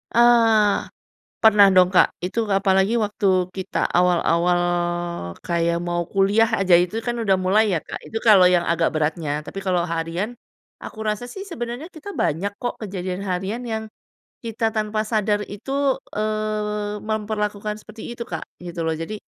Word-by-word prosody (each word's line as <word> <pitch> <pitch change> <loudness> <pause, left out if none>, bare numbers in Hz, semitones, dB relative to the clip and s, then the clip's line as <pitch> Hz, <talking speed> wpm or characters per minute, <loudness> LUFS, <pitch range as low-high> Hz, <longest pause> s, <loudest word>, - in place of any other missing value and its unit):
Eee. 230 -3 +4 0.5
Pernah 210 -3 +7
dong, 180 -1 +6
Kak, 185 - +4
itu 205 +6 -1
apalagi 195 +2 +2
waktu 195 -3 +1
kita 190 +1 -2
awal-awal, 175 0 +2 0.8
kayak 170 0 0
mau 175 0 -2
kuliah 195 +5 +3
aja 185 -3 +5
itu 180 +6 0
kan 240 +1 -3
udah 220 -4 +2
mulai 200 +3 +2
ya, 165 - +1
Kak, - - -7
itu 225 - -5
kalau 205 -5 +6
yang 180 -1 +4
agak 170 -1 +1
beratnya, 155 -1 -1
tapi 150 - -10
kalau 180 -2 +2
harian. 170 +7 -3 0.5
Aku 220 - -8
rasa 215 +2 -2
sih 390 - -8
sebenarnya 280 -3 -6
kita 360 +4 -9
banyak 195 - -1
kok 245 - -3
kejadian 185 -2 -4
harian 190 +5 -2
yang, 220 -2 -3 0.6
kita 225 -1 -1
tanpa 215 0 -1
sadar 210 -2 +1
itu, 270 +6 -1 0.2
eee, 210 -1 -2
memperlakukan 210 -1 -2
seperti 220 +2 -10
itu 235 - -4
Kak 160 - -5 0.2
gitu 175 -1 -6
loh, 160 - 0
jadi 165 +7 -5
205 Hz, 150 wpm, -22 LUFS, 180-220 Hz, 0.8 s, Pernah